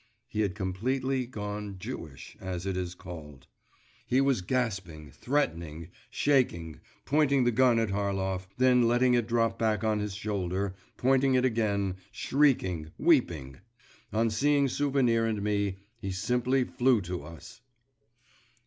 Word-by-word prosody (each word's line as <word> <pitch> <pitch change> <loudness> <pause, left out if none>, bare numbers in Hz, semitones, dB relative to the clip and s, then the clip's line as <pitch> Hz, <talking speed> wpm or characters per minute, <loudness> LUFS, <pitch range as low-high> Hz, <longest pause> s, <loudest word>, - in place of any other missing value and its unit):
He 110 -2 -2
had 100 -3 0
completely 125 +7 -1
gone 105 -3 -5
Jewish, 90 - -8
as 95 -1 -4
it 95 -1 -1
is 90 -1 -3
called. 80 -7 -10 0.6
He 130 - +3
was 135 -6 +2
gasping, 95 - -3
threatening, 85 - -2 0.2
shaking, 85 - +1 0.3
pointing 140 -2 +3
the 120 - +3
gun 125 0 +4
at 115 -2 +1
Harlov, 95 -2 -1
then 125 -1 +4
letting 125 +1 +3
it 120 -2 +2
drop 115 -1 +1
back 110 -2 +1
on 110 -1 +1
his 105 -2 -3
shoulder 100 -2 -2 0.2
pointing 135 +1 +3
it 125 0 +3
again, 100 -6 0
shrieking, 110 - +1
weeping.… 70 -6 +1 0.5
On 115 +1 +1
seeing 140 +5 +3
Souvenir 130 -5 +2
and 105 -2 -2
me 100 -2 0 0.2
he 100 -3 -4
simply 125 +7 +1
flew 125 -1 +2
to 90 -3 -5
us. 85 +8 -12
110 Hz, 135 wpm, -29 LUFS, 95-125 Hz, 0.6 s, gun